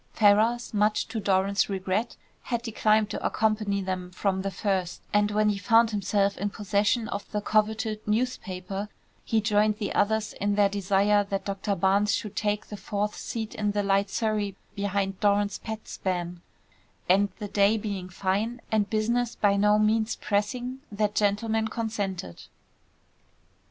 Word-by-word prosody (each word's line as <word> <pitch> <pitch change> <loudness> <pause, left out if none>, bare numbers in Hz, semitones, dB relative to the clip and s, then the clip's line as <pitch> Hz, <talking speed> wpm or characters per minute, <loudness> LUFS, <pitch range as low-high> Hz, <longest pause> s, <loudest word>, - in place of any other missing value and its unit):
Ferrars, 220 +4 +3
much 210 0 +2
to 225 0 -3
Doran's 195 0 +1
regret, 195 +4 -2 0.3
had 235 -2 -2
declined 215 -2 +2
to - - -4
accompany 215 -2 0
them 185 -1 -3
from 190 +1 -1
the 195 - -2
first, 190 -3 -2
and 205 0 +3
when 210 0 +2
he 200 -1 -1
found 230 +3 +4
himself 200 0 0
in 205 - -1
possession 205 +3 0
of 200 - -5
the 210 - 0
coveted 215 +1 0
newspaper, 205 -4 -2 0.3
he 225 - +1
joined 210 0 +2
the 210 -2 -3
others 220 +1 +1
in 205 0 -1
their 205 -1 +4
desire 200 +1 +2
that 195 -1 -3
Doctor 200 0 -2
Barnes 200 +3 +2
should 210 -2 -5
take 210 -1 -1
the 210 - -8
fourth 210 +1 -2
seat 220 -2 -5
in 210 -1 -1
the 205 0 0
light 195 0 +2
surrey 210 -2 -1 0.2
behind 200 -1 -2
Doran's 205 -1 +2
pet 220 -1 -7
span; 175 -2 -3 0.7
and 200 +3 +4
the 210 - -5
day 205 +2 +3
being 200 -4 -4
fine, 200 +6 -1
and 210 -2 +1
business 235 +2 0
by 200 -1 +3
no 210 +1 +4
means 215 +1 +2
pressing, 245 +5 -2
that 205 0 0
gentleman 220 +2 +1
consented. 205 - -4
205 Hz, 155 wpm, -27 LUFS, 200-215 Hz, 0.7 s, found